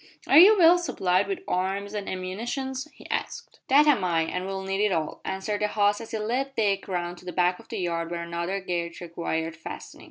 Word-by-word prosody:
"Are 285 - +7
you 415 +5 +8
well 350 0 +7
supplied 190 - +1
with 195 - -4
arms 195 +3 -1
an' 205 -2 -4
ammunition?" 225 +9 -4 0.2
he - - -14
asked. 470 - -4
"That 285 +3 +6
am 280 -10 +4
I, 170 -2 +2
and 180 +3 -3
we'll 195 0 -4
need 195 +1 -1
it 210 - +2
all," 160 -3 -2
answered 195 +2 -3
the 210 - +2
host 205 0 +1
as 225 - -9
he 225 - -3
led 255 +6 -2
Dick 200 -3 0
round 175 -2 -3
to - - -17
the 180 - -4
back 180 0 +1
of - - -16
the - - -4
yard 170 -2 -2
where 170 0 -4
another 170 +3 -3
gate 170 -2 -3
required 165 -1 -3
fastening. 165 - -9
190 Hz, 220 wpm, -26 LUFS, 175-215 Hz, 0.2 s, you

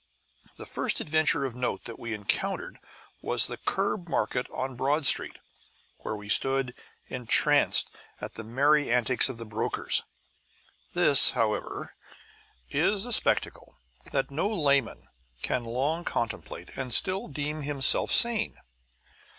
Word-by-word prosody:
The - - -8
first - - 0
adventure 155 -2 +2
of 130 - -4
note 125 0 -3
that 115 - -6
we 115 - -6
encountered 105 -2 -3 0.4
was - - +3
the - - -4
curb 195 -2 -2
market 125 -3 -1
on 130 0 -5
Broad 140 +4 0
Street, - - +2 0.6
where - - -5
we 105 0 -10
stood 135 +3 +1 0.3
entranced 125 -3 +2 0.3
at - - -7
the 110 - -8
merry 140 +5 +2
antics 125 +2 +3
of 130 - -7
the 115 - -8
brokers. 105 0 0 0.9
This, - - +6
however, - - -2 0.8
is 205 0 +1
a 245 - 0
spectacle - - 0 0.3
that 135 0 -1
no 160 +8 -1
layman 140 - 0 0.4
can 120 - -1
long 140 +9 -2
contemplate 120 -8 -4
and 130 -2 -5
still 190 - +1
deem 150 +1 -4
himself 140 -2 +3
sane. 235 -2 +4
135 Hz, 130 wpm, -27 LUFS, 120-155 Hz, 0.9 s, This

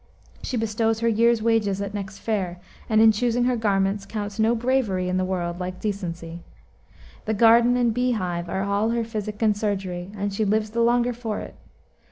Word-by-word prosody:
She 255 - -3
bestows 225 0 0
her 230 - +2
year's 230 0 +3
wages 220 -4 +1
at 200 0 -4
next 195 -1 -6
fair, 195 -5 -2 0.3
and, 215 -1 +3
in 225 0 +8
choosing 240 +2 0
her 250 0 +2
garments, 200 -2 0
counts 205 -1 -5
no 225 +2 +3
bravery 230 -7 0
in 185 - 0
the 185 - +1
world 175 -2 -2
like 180 0 -5
decency. 175 -5 -5 0.8
The 220 - 0
garden 235 +3 +5
and 240 -2 +2
bee 250 +1 +1
hive 175 -5 -3
are 190 - -1
all 200 +2 0
her 235 0 0
physic 215 -2 -5
and 215 -2 +3
surgery, 190 -4 -3
and 200 0 -2
she 215 - 0
lives 215 +1 0
the 235 +1 0
longer 240 +1 +2
for 225 -3 -4
it. - - -8
215 Hz, 195 wpm, -24 LUFS, 195-230 Hz, 0.8 s, in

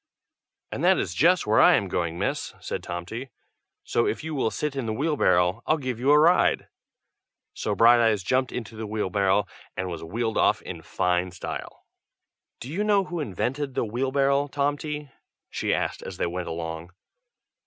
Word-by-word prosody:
"And - - -4
that - - +5
is 85 - -2
just 175 - +3
where 110 +1 +3
I - - +7
am 100 - 0
going, 85 -2 -2
miss," - - -2
said - - -4
Tomty; 90 +9 -6 0.5
"so 120 - +1
if - - -2
you 160 0 -4
will 135 -6 +1
sit 150 +4 -3
in 130 -4 -3
the 110 - -1
wheelbarrow, 110 - +2
I'll 155 - +3
give 130 -5 -4
you 130 +3 +1
a 150 - +7
ride!" 165 +4 +4 0.9
so 105 - -2
Brighteyes 115 -3 +5
jumped 130 +5 +1
into 115 -2 -6
the 110 0 -5
wheelbarrow 100 -1 +1 0.3
and 95 0 -2
was 85 -2 -6
wheeled 110 +6 -2
off - - +3
in - - -7
fine 90 0 0
style. 90 0 -7 0.7
"Do 130 - -8
you 200 +5 0
know 205 -2 +3
who 175 -2 -5
invented 135 - -3
the - - 0
wheelbarrow, 135 +4 +1
Tomty?" 145 +1 -2 0.4
she - - -1
asked - - -1
as 95 - -8
they - - 0
went 90 +1 -4
along. 80 +1 -5
115 Hz, 175 wpm, -25 LUFS, 95-140 Hz, 0.9 s, I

